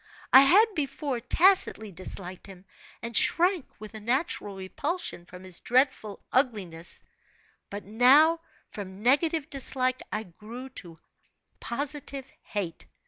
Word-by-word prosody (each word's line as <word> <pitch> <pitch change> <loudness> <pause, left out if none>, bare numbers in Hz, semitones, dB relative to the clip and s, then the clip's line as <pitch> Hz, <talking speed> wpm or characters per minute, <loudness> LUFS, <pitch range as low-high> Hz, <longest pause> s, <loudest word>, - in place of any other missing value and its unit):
I 265 - +11
had, 365 +11 +6
before, 275 -4 -3
tacitly 250 - +3
disliked 185 +1 -9
him, 190 -1 -13 0.4
and 235 0 -5
shrank 355 -3 +3
with 215 0 -10
a 220 - -7
natural 235 - -1
repulsion 190 - -4
from 180 0 -12
his 185 -2 -4
dreadful 250 -5 0
ugliness; 200 -11 -1 0.7
but 205 0 -7
now, 270 - +5 0.3
from 195 0 -9
negative 300 +4 +2
dislike, 255 -3 +1
I 215 +1 -2
grew 220 +7 -10
to 175 -10 -10 0.6
positive 280 +1 -3 0.2
hate. 190 -6 -5
240 Hz, 120 wpm, -27 LUFS, 195-280 Hz, 0.7 s, I